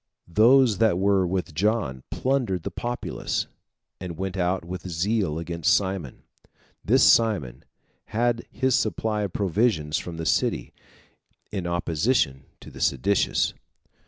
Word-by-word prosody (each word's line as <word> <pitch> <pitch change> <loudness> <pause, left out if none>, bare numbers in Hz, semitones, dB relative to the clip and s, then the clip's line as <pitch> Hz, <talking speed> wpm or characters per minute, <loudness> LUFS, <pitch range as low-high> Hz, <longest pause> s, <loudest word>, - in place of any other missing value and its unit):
Those 115 +1 +5
that 110 -6 +3
were 95 -1 +2
with 90 -2 -2
John 90 - 0
plundered 125 -10 -1
the 100 - -4
populace, 120 +6 -3 0.5
and 90 -3 -6
went 95 +1 -3
out 90 -1 -1
with 90 +1 -6
zeal 90 -1 0
against 85 -1 -1
Simon. 95 -9 -3 0.6
This - - +4
Simon 105 - +3 0.4
had 115 +2 -1
his 130 0 0
supply 110 +1 0
of 100 -3 -2
provisions 95 -6 +1
from 85 -2 -7
the 80 - -4
city, - - 0 0.8
in 95 -4 -3
opposition 85 - 0 0.2
to - - -11
the - - -10
seditious. 90 +10 +1
95 Hz, 130 wpm, -25 LUFS, 85-110 Hz, 0.8 s, Those